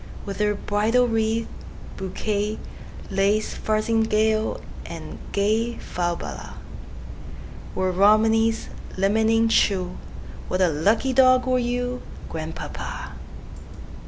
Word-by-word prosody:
With 200 0 -5
her 210 0 +2
bridal 220 +5 +2
wreath, 225 0 0 0.5
bouquet, 205 +2 -2 0.5
Lace 200 +2 +1
farthingale, 220 0 +1 0.2
and - - -8
gayFalbala, 205 -4 -2 1.2
Were 185 0 +1
Romney's 220 +4 +3 0.3
limning 220 +3 +3
true, 185 -5 +1 0.5
What 185 - -1
a 185 -2 +4
lucky 205 - +1
dog 255 -1 +5
were 255 -1 +2
you, 245 +1 -2 0.3
Grandpapa! 160 0 -6
215 Hz, 85 wpm, -24 LUFS, 195-225 Hz, 1.2 s, dog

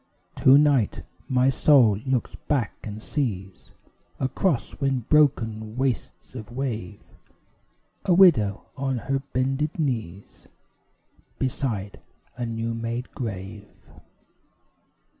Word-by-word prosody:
To 135 +1 +7
night 145 -7 +2 0.3
my 130 0 +3
soul 130 -8 +5
looks 130 -2 0
back 135 -8 -1
and 110 0 -7
sees, 95 - -4 0.5
Across 135 +2 -1
wind 135 -4 -1
broken 110 -7 +2
wastes 130 -2 -3
of 120 -2 -8
wave, 115 -7 -4 1.1
A 180 - +4
widow 115 - +5
on 135 -2 -1
her 135 +3 -1
bended 135 +2 -2
knees 110 - -4 0.9
Beside 115 -7 -3 0.4
a 120 -1 -3
new 115 0 -3
made 115 +2 -4
grave. 100 -4 -6
125 Hz, 100 wpm, -25 LUFS, 110-135 Hz, 1.1 s, To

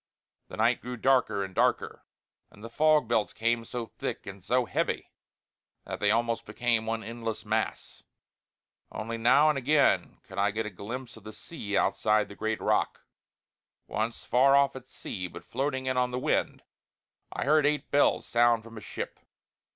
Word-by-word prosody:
The - - -10
night 115 +3 +2
grew 125 +1 -6
darker 125 -5 +2
and 95 -1 -7
darker; - - 0 0.5
and 105 - -17
the 115 - -8
fog 155 -2 +3
belts 110 -2 +1
came 115 +1 0
so 120 +1 -5
thick - - -6
and 100 -2 -9
so 125 +5 +1
heavy - - -2 0.7
that - - -5
they 105 - +2
almost 115 +1 0
became 120 -2 0
one 115 0 -2
endless 115 0 -5
mass. - - -2 0.9
Only 115 +2 -5
now 130 +6 +5
and 150 -3 +1
again 145 +2 +2
could - - -8
I 100 +1 +3
get 110 +2 -2
a 105 - -5
glimpse 120 +6 -7
of 110 - -15
the 110 +1 -9
sea 105 -11 -5
outside 105 +1 +2
the 100 - -10
great 110 +1 -2
rock. - - 0 0.8
Once, 115 +2 -3
far 135 +3 +5
off 140 0 +4
out 130 - -6
at 130 - -27
sea 90 -3 -6
but - - -11
floating 130 +1 -2
in 130 0 -1
on 125 0 +2
the 125 - -3
wind, 130 - -1 0.7
I - - -3
heard 150 +1 +4
eight 150 0 -1
bells 145 - +3
sound 120 -1 +3
from 115 0 -12
a - - -15
ship. - - -6
115 Hz, 180 wpm, -28 LUFS, 110-130 Hz, 0.9 s, now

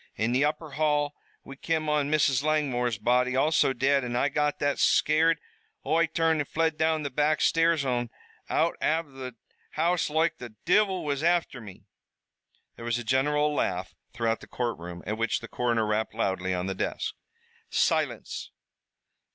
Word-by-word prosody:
In 110 +3 0
the 130 +3 +2
upper 150 +1 -2
hall 150 0 +1 0.3
we 135 - -10
kim 155 +2 -2
on 150 -1 +1
Mrs. 140 -3 +3
Langmore's 135 -7 0
body, 125 +4 +2
also 150 +1 +3
dead, 135 +2 +2
an' 120 -1 -3
I 135 +4 +2
got 150 +1 0
that 145 -1 0
scared 160 +2 +3 0.5
Oi 165 +1 +2
turned 165 -1 +1
an' - - -3
flew 165 0 +1
down 160 0 0
the 140 - -3
back 150 +3 +1
stairs 165 -3 +3
an' 120 -2 -1 0.4
out - - +1
av 160 -1 0
the 130 -2 -8 0.4
house 170 +2 +1
loike 160 +1 +1
the 120 -3 -9
divil 190 -1 +2
was 140 -1 -1
afther 170 -6 +1
me!" 100 -4 -12 0.9
There 115 - -8
was 120 0 0
a 120 - -5
general 150 +5 +1
laugh 95 -9 -2 0.2
throughout 115 -1 -1
the - - -13
courtroom, 90 -8 -4
at 105 +2 -3
which 115 - 0
the 115 - -9
coroner 115 -2 0
rapped 105 +1 -1
loudly 95 -4 -1
on 90 0 -1
the 95 - -2
desk. - - -3 0.6
"Silence. - - -1
140 Hz, 165 wpm, -27 LUFS, 120-155 Hz, 0.9 s, Mrs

